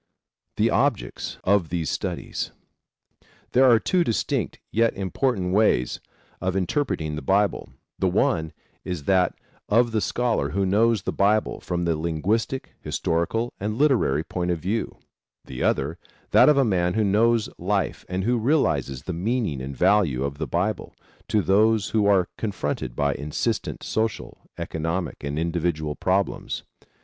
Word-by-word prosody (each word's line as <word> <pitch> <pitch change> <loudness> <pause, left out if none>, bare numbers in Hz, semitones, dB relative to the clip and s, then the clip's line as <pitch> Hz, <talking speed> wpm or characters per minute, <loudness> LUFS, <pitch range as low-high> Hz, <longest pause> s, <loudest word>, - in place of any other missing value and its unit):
THE - - +3
OBJECTS - - -1
OF 95 -4 +2
THESE 85 -2 -2
STUDIES, - - -3 1.0
There 130 +1 +5
are 115 - +7
two 180 +10 +2
distinct 115 - -1
yet 115 +1 +2
important 95 -1 -1
ways 95 - +2 0.4
of 95 0 -1
interpreting 90 - -1
the 75 - -5
Bible: 100 +8 +1 0.3
The 95 - +2
one 80 -3 +1 0.3
is 90 -5 -4
that 90 +2 +2 0.3
of 115 +2 +4
the 110 -1 0
scholar 120 +1 0
who 100 0 0
knows 105 +1 +2
the - - -1
Bible 105 +2 +1
from 85 -1 -2
the 85 -1 +1
linguistic, 85 - -1
historical 100 +9 -1
and 105 +2 -3
literary 120 - +3
point 90 +1 -3
of 85 - +1
view; 100 +8 -3 0.5
the 65 -1 -7
other, 80 +6 0 0.3
that - - +7
of 150 - +5
the 135 -1 +4
man 90 -4 +1
who 110 - +2
knows 110 +3 +3
life - - -1
and 90 +1 -2
who 120 +3 +1
realizes 75 - +1
the 90 - -4
meaning 95 - -1
and 65 +1 -6
value 90 -9 +3
of 70 +1 -4
the 80 - -2
Bible 95 +3 -2 0.3
to 105 -2 +1
those 110 +1 +3
who 105 -2 +2
are 95 -3 +4
confronted 90 - -3
by 70 0 +1
insistent 75 +2 -3
social, 110 -1 -2 0.2
economic 80 +1 -3
and 70 +1 -3
individual 80 -2 -1
problems. 95 +1 -1
95 Hz, 150 wpm, -24 LUFS, 80-110 Hz, 1.0 s, are